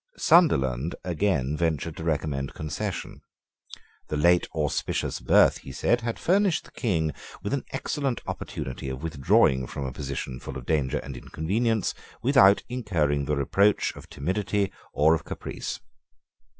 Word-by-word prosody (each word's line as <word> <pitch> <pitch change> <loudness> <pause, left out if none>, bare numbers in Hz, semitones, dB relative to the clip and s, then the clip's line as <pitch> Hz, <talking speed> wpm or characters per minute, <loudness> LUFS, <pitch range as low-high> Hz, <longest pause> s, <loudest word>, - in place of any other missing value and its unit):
Sunderland 75 - +3
again 85 -6 0
ventured 80 -1 -1
to - - -6
recommend 75 -4 -2
concession. 75 -1 -4 0.9
The 75 - -2
late 85 +3 +4
auspicious 75 -2 -1
birth, - - +4
he - - -10
said, 120 - +1
had 115 0 -3
furnished 190 -2 +2
the - - -16
King 80 - 0 0.3
with - - -2
an - - -1
excellent 135 -4 -2
opportunity 65 +1 -5
of 65 +2 -6
withdrawing 65 -4 +3
from 70 - -5
a 65 - -3
position 65 -1 -5
full 65 - -7
of 65 - -9
danger 75 -4 +1
and 70 -1 -6
inconvenience 105 - -1 0.3
without 105 -7 +6
incurring 85 - 0
the 75 - 0
reproach 100 +9 +2
of - - -12
timidity 100 +5 -1 0.2
or 80 +2 +4
of 80 - -1
caprice. - - -5
80 Hz, 140 wpm, -26 LUFS, 70-105 Hz, 0.9 s, without